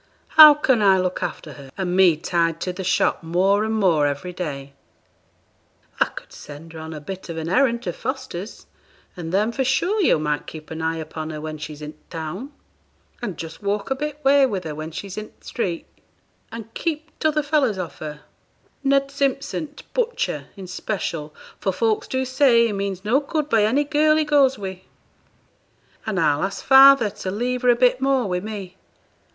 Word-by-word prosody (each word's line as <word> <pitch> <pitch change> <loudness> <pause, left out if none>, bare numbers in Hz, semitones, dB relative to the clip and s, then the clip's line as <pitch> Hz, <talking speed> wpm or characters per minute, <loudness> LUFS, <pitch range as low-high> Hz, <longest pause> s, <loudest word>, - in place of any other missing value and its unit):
'How 305 -2 +10
can 260 -6 +2
I 195 -2 +5
look 185 0 -2
after 165 -4 -5
her, 140 -1 -12
and 180 -2 -1
me 185 -4 +5
tied 165 0 0
to 180 - -2
the 190 - -6
shop 180 - +1
more 185 +5 +2
and 220 0 -1
more 170 -8 +3
every 145 +6 -4
day?' 140 -6 -6 1.3
'I - - +5
could - - -11
send 155 +3 -11
her 160 - -8
on 160 0 -7
a 155 - -6
bit 185 +5 -8
of 165 - -5
an 160 0 -4
errand 235 +4 +2
to - - -3
Foster's, 260 -7 -6 0.5
and 165 -3 -6
then, 210 +5 +1
for 265 +3 -1
sure, 350 +11 +1
yo' 345 - +4
might 150 -1 -2
keep 155 0 -10
an 160 0 -5
eye 160 0 0
upon 155 0 -6
her 155 -1 -6
when 155 0 -6
she's 150 0 -8
in 150 +1 -7
th' - - -34
town; 175 - -6 0.7
and 205 -7 -4
just 165 -1 -8
walk 200 +4 -2
a - - +2
bit 295 +1 -4
way 280 0 +6
with 195 -6 -3
her 155 - -5
when 155 +1 -6
she's 190 +4 -7
in 215 - -8
th' - - -31
street, 180 -8 -3 0.7
and 225 0 -9
keep 315 -1 -3
t' 315 - +2
other 305 -1 +1
fellows 285 -8 +1
off 180 -3 -6
her 150 -1 -7 0.6
Ned 275 0 +2
Simpson, 275 +2 -1
t' - - -13
butcher, 475 -1 -1
in 195 -2 -9
'special, 175 -4 -4 0.3
for 190 - 0
folks 215 +3 0
do 260 0 -1
say 260 -3 +4
he 225 - -1
means 195 -1 -4
no 240 +6 +3
good 300 +1 -2
by 220 -6 +3
any 265 +7 +2
girl 305 +1 +3
he 310 - +2
goes 280 -3 +3
wi' 190 -2 -6 1.3
and 205 -4 -1
I'll 150 -3 +2
ask 195 +1 -4
father 270 -4 +7
to 190 - -6
leave 245 +5 -2
her 250 - +3
a 240 - +6
bit 250 +1 +3
more 270 -1 +2
wi' 180 -1 -1
me. 200 -2 -7
200 Hz, 200 wpm, -22 LUFS, 165-265 Hz, 1.3 s, How